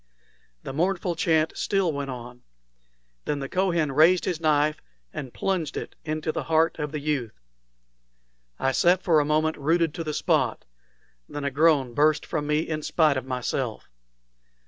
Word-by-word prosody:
The - - -6
mournful 180 +3 0
chant 160 -1 +1
still 195 -5 0
went 140 -1 -4
on. 125 -1 -8 0.8
Then 150 - -1
the 140 -1 -4
Kohen 170 -4 0
raised 165 +6 +4
his 170 -3 -2
knife 150 -1 +2 0.3
and 130 -3 -6
plunged 170 -4 -2
it - - -6
into 155 0 -2
the - - -4
heart 160 0 +2
of 150 -1 -3
the 150 - -3
youth. 140 - -3 1.2
I 135 - +1
sat 175 +6 +3
for 160 -3 +4
a 145 - +1
moment 155 +1 +1
rooted 160 +2 +1
to 165 - -4
the 155 -2 -4
spot; - - 0 0.6
then 145 - -5
a 140 - -1
groan 140 -3 +3
burst 150 +3 +2
from 150 -3 -3
me 150 +1 +2
in 155 -1 -3
spite 155 -1 +2
of 130 -1 -3
myself. 125 - -3
155 Hz, 165 wpm, -25 LUFS, 140-165 Hz, 1.2 s, raised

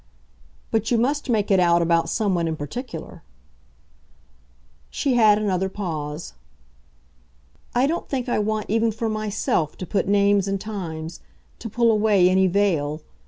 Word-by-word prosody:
"But 225 0 0
you 240 - +2
must 280 +4 0
make 210 -3 +1
it 195 - +5
out 170 -1 +4
about 165 -1 +2
someone 185 -6 0
in 160 - -2
particular." 160 - -7 1.7
She 275 - -1
had 215 -4 +5
another 190 -3 0
pause. 160 -5 -5 1.4
"I 250 +2 +4
don't 330 +5 -2
think 260 -2 -2
I 240 - 0
want 215 0 -1
even 225 +2 +1
for 225 +1 -3
myself 215 - -1
to 185 - -5
put 195 +1 -1
names 200 -1 +3
and 195 0 -1
times, 170 -6 -6 0.4
to 225 - -6
pull 235 +1 +3
away 210 -4 +4
any 190 0 +4
veil. 165 -6 0
205 Hz, 145 wpm, -23 LUFS, 175-225 Hz, 1.7 s, it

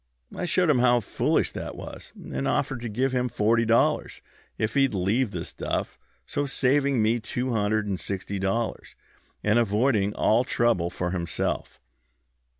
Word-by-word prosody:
I - - -3
showed 175 -2 +3
him 130 - +3
how 120 0 +4
foolish 110 - 0
that - - -6
was, - - -9
and - - -4
offered 125 -3 0
to 120 - -4
give 130 +5 0
him 125 -1 0
forty 115 +2 +2
dollars 115 +1 +2 0.4
if 110 0 -1
he'd 135 -5 +2
leave 105 +7 +1
the - - -5
stuff, - - -4 0.3
so 145 0 -2
saving 135 -2 +2
me 115 +2 +2
two 125 +3 -3
hundred 110 -1 +1
and 95 -3 -2
sixty 100 0 -4
dollars, 100 +4 -2 0.5
and 105 +3 +3
avoiding 105 -1 +1
all 115 +3 +3
trouble 115 -9 +1
for 90 0 -3
himself. 85 -5 -3
115 Hz, 155 wpm, -26 LUFS, 105-125 Hz, 0.5 s, how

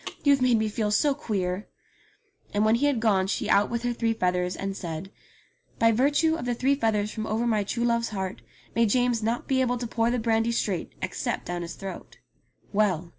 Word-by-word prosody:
You've 280 -2 +4
made 250 -2 +4
me 220 0 +1
feel 215 0 -1
so 280 +8 +3
queer 195 -7 -3 0.4
!" 410 -4 -34
And 210 +1 +3
when 220 - +4
he 260 +5 +3
had 280 -5 +1
gone 200 -4 +2
she - - -1
out 200 +1 +4
with 235 0 -3
her 245 0 0
three 230 -1 0
feathers, 180 -3 0
and 195 0 -4
said, 170 +1 -6 0.7
"By 230 0 +4
virtue 290 +7 +3
of 325 -6 -3
the 245 -1 0
three 265 +4 +2
feathers 215 -6 0
from 220 -1 -4
over 225 +2 0
my 215 -3 +2
true 235 +4 -2
love's 235 -1 +1
heart 190 -2 -4 0.3
may 230 0 +4
James 245 +1 +2
not 230 +2 -1
be 260 -1 +2
able 245 -1 +1
to 240 - -4
pour 230 0 0
the 245 - +1
brandy 225 0 +1
straight, 195 -7 -1
except 185 -1 -3
down 175 0 -3
his 170 0 -6
throat." 195 -1 -8 0.6
Well 185 -5 +1
225 Hz, 215 wpm, -26 LUFS, 200-245 Hz, 0.7 s, You've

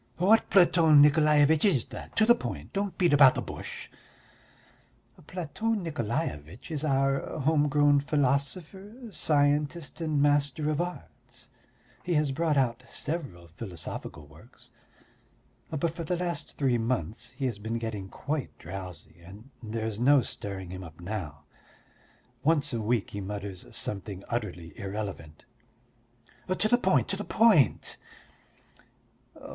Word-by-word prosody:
"What 205 +6 +4
Platon 170 -5 +6
Nikolaevitch 150 +1 +5
is 155 - +3
that? - - -9
To 220 - +4
the 240 - +7
point. 240 - -6
Don't 200 -1 -2
beat 175 -5 +3
about 140 -3 +7
the - - -1
bush." - - -8 1.4
"Platon 190 +5 -2
Nikolaevitch 120 - -4
is 150 -2 -3
our 135 -2 +2 0.2
home 150 +1 +3
grown 145 0 +4
philosopher, 150 - -1 0.2
scientist 150 0 +1
and 155 -3 0
Master 145 +1 +2
of 150 - 0
Arts. 175 0 -8 0.5
He 175 -1 -1
has 150 -2 +2
brought 155 +1 0
out 125 -2 +1
several 140 - -5
philosophical 85 -3 -7
works, 80 - -15 1.0
but 160 +1 -1
for 170 - -5
the 175 +2 -1
last 175 -1 -4
three 130 -4 +1
months 115 0 -3
he 135 - -2
has 115 -5 -2
been 110 +2 -3
getting 110 -4 -5
quite 145 +4 -4
drowsy, 90 -3 -9
and 105 +9 -13
there 110 -1 -4
is 110 -1 -4
no 135 +1 +5
stirring 95 -5 -6
him 95 0 -7
up 80 -1 -12
now. 85 -6 -6 1.0
Once 150 -3 +2
a 115 - -1
week 110 0 0
he 100 - -5
mutters 100 -1 -6
something 100 -1 -5
utterly 90 -8 -4
irrelevant." 100 -6 -6 1.0
"To 185 +3 +1
the 245 +3 +3
point, 190 -5 +2
to 195 - 0
the 205 - -5
point!" 210 - +3
140 Hz, 135 wpm, -28 LUFS, 105-160 Hz, 1.4 s, the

